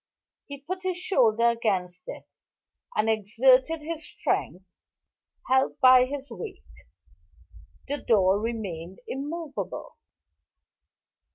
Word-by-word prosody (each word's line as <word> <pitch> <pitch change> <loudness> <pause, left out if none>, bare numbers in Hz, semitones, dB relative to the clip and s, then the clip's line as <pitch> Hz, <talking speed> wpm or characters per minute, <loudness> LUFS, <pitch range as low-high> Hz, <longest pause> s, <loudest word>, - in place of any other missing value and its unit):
He 280 -1 -8
put 365 +7 -5
his 370 -1 -2
shoulder 235 - +3
against 190 -6 -1
it, - - -7 0.7
and 215 - +1
exerted 255 +8 +3
his 325 +1 -5
strength, 185 -9 -2 0.8
helped 260 +1 +2
by 255 -1 +7
his 280 +1 -6
weight. 425 -4 -8 1.2
The 285 +1 -1
door 195 -3 +3
remained 195 -6 -5
immovable. 295 +3 -5
255 Hz, 95 wpm, -26 LUFS, 215-295 Hz, 1.2 s, by